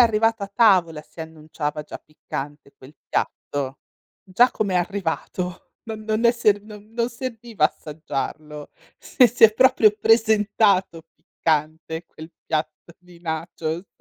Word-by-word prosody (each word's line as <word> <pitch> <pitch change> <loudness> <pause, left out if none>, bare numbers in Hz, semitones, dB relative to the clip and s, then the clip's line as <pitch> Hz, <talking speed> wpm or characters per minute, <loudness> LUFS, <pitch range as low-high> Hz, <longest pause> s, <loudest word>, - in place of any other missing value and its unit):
arrivato 225 -2 +3
a 200 - -12
tavola 180 -9 +4
si 160 - -14
annunciava 155 -1 -5
già 150 - -9
piccante 145 -1 -8
quel 130 +3 -15
piatto. 140 -1 -3 0.4
Già 220 +7 +3
come 195 -3 -1
è - - +4
arrivato 180 -1 -4
non 220 -2 -7
non 220 +2 -1
è 235 - +7
serv 215 -4 +2
non 210 +1 -13
non 235 0 0
serviva 235 - -3
assaggiarlo. 150 -1 -4 0.3
Sì, 250 - +4
si 235 0 -5
è 220 - +9
proprio 255 -3 +5
presentato 210 -5 +3
piccante 160 +1 -2
quel 160 +1 -12 0.2
piatto 160 +2 -3
di 180 -1 -18
nachos. 165 +1 -4
180 Hz, 135 wpm, -23 LUFS, 155-220 Hz, 0.4 s, è